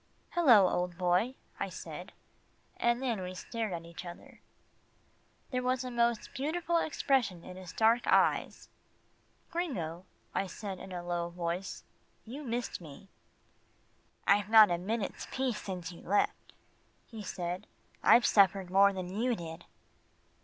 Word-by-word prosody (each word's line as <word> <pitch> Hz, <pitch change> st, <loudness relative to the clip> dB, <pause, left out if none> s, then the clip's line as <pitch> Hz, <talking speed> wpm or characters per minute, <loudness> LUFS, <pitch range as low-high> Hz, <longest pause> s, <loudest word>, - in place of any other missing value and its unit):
"Hello, 245 Hz, -, +6 dB
old 180 Hz, -1 st, -1 dB
boy," 185 Hz, +8 st, +2 dB, 0.2 s
I -, -, -2 dB
said, -, -, -8 dB, 0.7 s
then 235 Hz, -3 st, +1 dB
we 185 Hz, 0 st, -5 dB
stared 225 Hz, +2 st, -4 dB
at 170 Hz, -1 st, -5 dB
each 170 Hz, +1 st, -9 dB
other. 175 Hz, -1 st, -11 dB, 1.1 s
There 255 Hz, -1 st, 0 dB
was 255 Hz, 0 st, 0 dB
a 255 Hz, -, -5 dB
most 235 Hz, -1 st, 0 dB
beautiful 335 Hz, +5 st, 0 dB
expression 265 Hz, -, +1 dB
in 180 Hz, -, -9 dB
his 185 Hz, -2 st, -9 dB
dark 225 Hz, +4 st, +3 dB
eyes. -, -, +2 dB, 0.8 s
"Gringo," 185 Hz, -, -3 dB, 0.3 s
I 195 Hz, -, 0 dB
said 190 Hz, +1 st, -6 dB
in 190 Hz, -, -9 dB
a 175 Hz, -1 st, -5 dB
low 175 Hz, -1 st, -2 dB
voice, 175 Hz, +2 st, -4 dB, 0.4 s
"you 255 Hz, +6 st, -7 dB
missed 240 Hz, -6 st, -3 dB
me." 160 Hz, +4 st, -12 dB, 1.2 s
"I've 205 Hz, +1 st, +3 dB
not 220 Hz, -1 st, +9 dB
had 170 Hz, -, +1 dB
a -, -, -9 dB
minute's 215 Hz, +1 st, -3 dB
peace 255 Hz, -5 st, -1 dB
since 180 Hz, -3 st, -5 dB
you 170 Hz, -, -12 dB
left," 205 Hz, +3 st, 0 dB, 0.5 s
he 225 Hz, -2 st, -9 dB
said. 180 Hz, 0 st, -4 dB, 0.3 s
"I've 240 Hz, -, +6 dB
suffered 195 Hz, -2 st, +4 dB
more 200 Hz, +1 st, +6 dB
than 185 Hz, -1 st, -5 dB
you 240 Hz, +4 st, +1 dB
did." 165 Hz, -4 st, -8 dB
200 Hz, 140 wpm, -31 LUFS, 180-240 Hz, 1.2 s, not